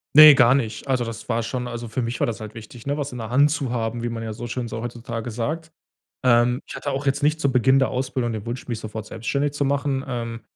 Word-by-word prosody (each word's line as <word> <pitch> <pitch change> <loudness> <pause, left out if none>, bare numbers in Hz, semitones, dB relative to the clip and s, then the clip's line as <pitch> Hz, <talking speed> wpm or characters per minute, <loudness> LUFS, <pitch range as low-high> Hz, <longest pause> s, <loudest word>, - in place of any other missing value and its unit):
Ne, 155 -1 +12
gar 125 0 +6
nicht. 110 -1 -2
Also, 130 -2 +1
das 115 +1 -7
war 115 0 +1
schon 125 +2 -3
also, 120 -1 -5
für 120 +4 -2
mich 115 +1 -3
war - - +3
das 115 -3 -3
halt 110 0 -8
wichtig, 115 +3 -11
ne, 145 - 0
was 145 -2 -3
in 125 - -7
der 110 -1 -5
Hand 140 +4 +4
zu 145 -4 -1
haben, 115 -1 -2
wie 120 - -2
man 115 -1 -4
ja 110 -1 -4
so 120 +2 -6
schön 120 0 -3
so 115 0 -5
heutzutage 120 -1 -5
sagt. 155 +9 -3 0.5
Ähm, 120 +1 +4
ich - - -8
hatte 145 - -4
auch 140 +2 -3
jetzt 140 +1 +1
nicht 155 +2 +2
zu 140 - +2
Beginn 130 +1 +4
der 135 - +2
Ausbildung 130 -2 -1
den 105 -2 -5
Wunsch 120 +2 -5
mich 120 -3 -3
sofort 110 0 -6
selbstständig 140 +7 -2
zu 145 -1 0
machen. 140 -1 0
Ähm, 115 -2 -4
120 Hz, 265 wpm, -23 LUFS, 115-135 Hz, 0.5 s, Ne